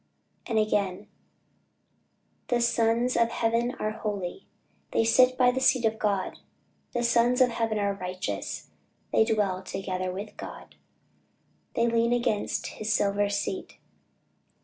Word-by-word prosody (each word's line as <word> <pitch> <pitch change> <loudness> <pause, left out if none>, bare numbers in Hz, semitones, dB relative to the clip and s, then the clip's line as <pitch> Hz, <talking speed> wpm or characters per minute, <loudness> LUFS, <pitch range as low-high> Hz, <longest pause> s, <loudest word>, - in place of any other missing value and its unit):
And 225 - 0
again 205 -2 0 1.4
"The 245 - +1
sons 235 +1 +2
of 230 0 +3
heaven 235 +2 0
are 215 - -2
holy, 205 - -4 0.5
They - - +3
sit 255 +3 +5
by 250 -1 +5
the 260 - -2
seat 260 -2 +3
of 220 0 0
God, 200 -3 -1 0.5
The 240 -1 -1
sons 240 +1 +3
of 255 -1 +5
heaven 225 -2 -1
are 200 -1 +1
righteous, 185 -1 -5 0.4
They - - +6
dwell 205 -5 0
together 185 -1 -3
with 200 +3 -7
God; - - -9 1.0
They 230 - +3
lean 235 0 +2
against 240 -4 0
his 215 0 -4
silver 205 0 +2
seat." 205 - -3
220 Hz, 130 wpm, -27 LUFS, 200-240 Hz, 1.4 s, They